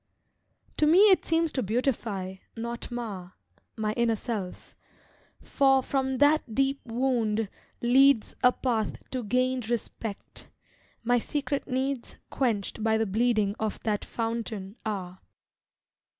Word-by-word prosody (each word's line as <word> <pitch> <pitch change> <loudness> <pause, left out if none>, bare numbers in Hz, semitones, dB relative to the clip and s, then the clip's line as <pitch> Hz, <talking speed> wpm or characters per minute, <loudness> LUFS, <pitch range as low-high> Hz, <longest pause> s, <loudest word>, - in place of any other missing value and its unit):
To 300 - +3
me 385 +6 +7
it 375 - +3
seems 325 -1 +2
to 260 - -1
beautify, 215 -4 -1 0.2
not 235 +1 -5
mar, 205 -7 -6 0.4
My 215 -1 -1
inner 235 0 +2
self, 205 -4 -5 0.7
for 270 -1 +3
from 265 -1 -1
that 290 -5 +3
deep 275 +1 +1
wound 225 -4 0 0.3
leads 265 0 +5
A 250 - +6
path 235 -4 -1
to 255 - -2
gained 255 +1 0
respect, 225 -2 -5 0.5
my 245 +1 +3
secret 285 +3 -2
needs 265 -1 -2 0.2
Quenched 220 -5 -1
by 220 0 +3
the 225 - +1
bleeding 215 -1 +1
of 215 -1 -2
that 210 -2 0
fountain 225 -4 -4
are. 190 -3 -4
235 Hz, 120 wpm, -28 LUFS, 215-265 Hz, 0.7 s, me